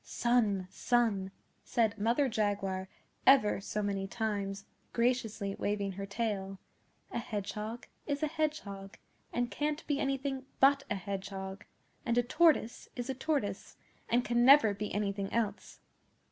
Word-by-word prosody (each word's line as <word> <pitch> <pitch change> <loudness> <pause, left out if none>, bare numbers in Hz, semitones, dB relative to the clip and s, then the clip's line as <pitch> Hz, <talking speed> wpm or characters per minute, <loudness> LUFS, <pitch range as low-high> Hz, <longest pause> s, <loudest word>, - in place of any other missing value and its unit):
'Son, 220 -6 +1
son!' 225 -6 +1 0.3
said 225 -3 +1
Mother 235 +7 +2
Jaguar 200 -4 -1 0.4
ever 255 -7 +6
so 210 +1 -3
many 195 -1 -1
times, 200 -3 -3 0.3
graciously 230 -4 0
waving 205 -1 -1
her 195 +1 -6
tail, 200 -2 -2 0.5
'a - - -2
Hedgehog 215 +1 -4 0.2
is 285 0 -1
a - - +3
Hedgehog, 290 -12 -3 0.3
and 240 0 -1
can't 300 +1 -2
be 290 -1 0
anything 270 -1 -2
but 275 +1 +6
a - - 0
Hedgehog; 195 0 -5 0.4
and 235 0 0
a 245 - +4
Tortoise 260 -3 +2
is 245 +1 -3
a - - -2
Tortoise, 255 -8 -2 0.3
and 245 +1 +2
can 240 0 +2
never 260 -5 +8
be 205 +1 -4
anything 200 -1 -2
else. 230 -3 -2
220 Hz, 135 wpm, -32 LUFS, 200-250 Hz, 0.5 s, never